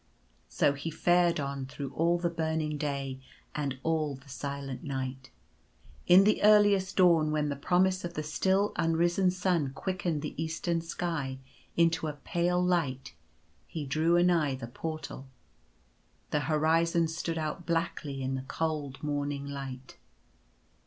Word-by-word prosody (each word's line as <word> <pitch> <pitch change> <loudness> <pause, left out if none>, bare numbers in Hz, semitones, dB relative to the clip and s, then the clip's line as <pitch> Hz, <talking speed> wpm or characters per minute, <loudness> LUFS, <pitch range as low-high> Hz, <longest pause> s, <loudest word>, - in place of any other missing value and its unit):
So 140 - +2
he 140 +4 -5
fared 175 +1 +3
on 140 -1 -3
through 135 0 -6
all 170 +4 +2
the 175 0 0
burning 160 -2 -1
day, 140 -3 -3 0.3
and 140 -2 -2
all 155 -3 0
the 135 +2 -16
silent 140 +1 -5
night. 135 -2 -4 0.8
In 180 +2 +8
the 210 +2 +3
earliest 205 -2 +5
dawn, 170 -5 +5
when 150 -1 0
the 140 - -2
promise 185 +5 +2
of 175 - -5
the 155 - -2
still 190 +6 +1
unrisen 170 +3 +2
sun 180 -6 0
quickened 175 -2 -2
the 150 - -4
eastern 165 +1 -1
sky 165 -5 -3 0.4
into 165 -2 +3
a 150 - -3
pale 175 +4 0
light, 150 -8 0 0.5
he 160 -4 -5
drew 160 +5 +2
anigh 170 -6 +3
the 130 - -6
Portal. 155 +2 -6 1.0
The 150 - +2
horizon 165 +2 +3
stood 165 +1 -3
out 155 +2 -4
blackly 165 -4 -2
in 130 0 -2
the 130 - -2
cold 150 -4 -3
morning 145 -1 -2
light. 135 -2 -7
155 Hz, 140 wpm, -30 LUFS, 140-170 Hz, 1.0 s, In